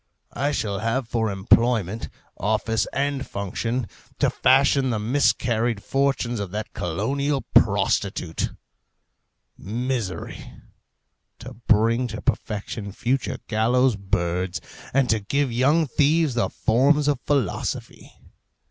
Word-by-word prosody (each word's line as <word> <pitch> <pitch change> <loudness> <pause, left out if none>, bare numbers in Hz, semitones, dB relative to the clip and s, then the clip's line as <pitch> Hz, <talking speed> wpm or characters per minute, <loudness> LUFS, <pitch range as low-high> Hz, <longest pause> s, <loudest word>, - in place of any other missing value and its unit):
I 145 +1 0
shall 100 -8 -2
have 115 +3 -1
for 115 -1 0
employment, 110 +1 +1 0.3
office, 110 +2 0
and 140 0 -1
function, 115 +5 -3 0.3
to - - +2
fashion 135 0 +3
the 115 - 0
miscarried 115 -1 +1
fortunes 135 -4 0
of 100 -2 -3
that 105 +3 -5
colossal 135 - -1
prostitute, 80 -2 +2 1.1
Misery, 115 -3 -4 0.8
to - - -9
bring 115 +3 +3
to 110 -1 -6
perfection 105 -1 -3
future 125 +6 -1
gallows' 120 +3 +2
birds, 90 -2 -1 0.3
and 135 -1 +2
to 110 - +2
give 135 +6 -1
young 140 +7 +3
thieves 150 +2 +2
the 120 - 0
forms 140 +6 +2
of 145 -4 +1
philosophy. 135 - -2
115 Hz, 110 wpm, -24 LUFS, 105-135 Hz, 1.1 s, fashion